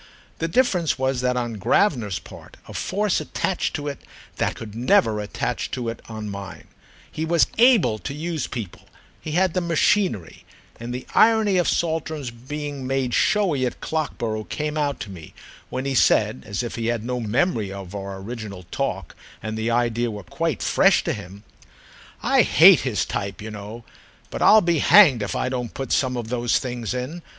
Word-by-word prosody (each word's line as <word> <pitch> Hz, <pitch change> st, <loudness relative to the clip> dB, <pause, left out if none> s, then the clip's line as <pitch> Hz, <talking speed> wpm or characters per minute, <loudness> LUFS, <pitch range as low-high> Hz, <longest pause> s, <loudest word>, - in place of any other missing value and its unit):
The 165 Hz, -, 0 dB
difference 180 Hz, -, +1 dB
was 130 Hz, -1 st, 0 dB
that 125 Hz, 0 st, 0 dB
on 120 Hz, -3 st, -3 dB
Gravener's 115 Hz, -, +2 dB
part -, -, -13 dB
a -, -, -10 dB
force 205 Hz, 0 st, 0 dB
attached 190 Hz, -, -2 dB
to 145 Hz, -1 st, -4 dB
it 140 Hz, -2 st, -4 dB, 0.4 s
that -, -, 0 dB
could 110 Hz, -2 st, -9 dB
never 115 Hz, -2 st, +2 dB
attach 105 Hz, -, -3 dB
to 120 Hz, -2 st, -3 dB
it 115 Hz, -, -7 dB
on 110 Hz, -1 st, -6 dB
mine. 100 Hz, -1 st, -8 dB, 0.5 s
He 155 Hz, -, -4 dB
was 165 Hz, +1 st, +3 dB
able 230 Hz, -, +5 dB
to 135 Hz, -, -5 dB
use 160 Hz, 0 st, -3 dB
people—he 120 Hz, -, -9 dB
had 180 Hz, 0 st, +2 dB
the 185 Hz, -, 0 dB
machinery; 170 Hz, -, +1 dB, 0.4 s
and 120 Hz, +1 st, -6 dB
the 125 Hz, +1 st, -5 dB
irony 220 Hz, -3 st, +4 dB
of 175 Hz, -, +2 dB
Saltram's 160 Hz, -5 st, -1 dB
being 140 Hz, +3 st, -6 dB
made 135 Hz, -2 st, -1 dB
showy 190 Hz, -10 st, +2 dB
at 125 Hz, -, -2 dB
Clockborough 115 Hz, -9 st, -3 dB
came 150 Hz, 0 st, -3 dB
out 145 Hz, -2 st, -1 dB
to 100 Hz, -, -6 dB
me 85 Hz, -5 st, -11 dB, 0.3 s
when 130 Hz, +1 st, -4 dB
he 135 Hz, -, -1 dB
said, 65 Hz, -, +2 dB
as 100 Hz, +4 st, -2 dB
if 120 Hz, -, -5 dB
he 115 Hz, -1 st, -2 dB
had 115 Hz, -2 st, -1 dB
no 125 Hz, 0 st, -2 dB
memory 115 Hz, -, 0 dB
of 100 Hz, -1 st, -8 dB
our 100 Hz, -1 st, -5 dB
original 100 Hz, -2 st, -7 dB
talk 95 Hz, -, -3 dB, 0.3 s
and 110 Hz, 0 st, -4 dB
the 110 Hz, +1 st, -1 dB
idea 120 Hz, 0 st, +1 dB
were 105 Hz, -2 st, -7 dB
quite -, -, -2 dB
fresh -, -, +4 dB
to -, -, -1 dB
him: 100 Hz, 0 st, -9 dB, 0.8 s
"I -, -, +4 dB
hate -, -, +7 dB
his -, -, -1 dB
type, 100 Hz, -2 st, -4 dB
you 110 Hz, +1 st, -7 dB
know, 105 Hz, +3 st, -8 dB, 0.5 s
but -, -, -5 dB
I'll 215 Hz, 0 st, +7 dB
be 170 Hz, -3 st, +1 dB
hanged 145 Hz, -, +7 dB
if 105 Hz, -, -3 dB
I -, -, -1 dB
don't 125 Hz, -3 st, -4 dB
put 135 Hz, -, -5 dB
some 130 Hz, -2 st, +1 dB
of 115 Hz, -2 st, -5 dB
those 120 Hz, -1 st, +1 dB
things 125 Hz, -1 st, -4 dB
in. 135 Hz, +8 st, -4 dB
125 Hz, 180 wpm, -23 LUFS, 110-155 Hz, 0.8 s, hate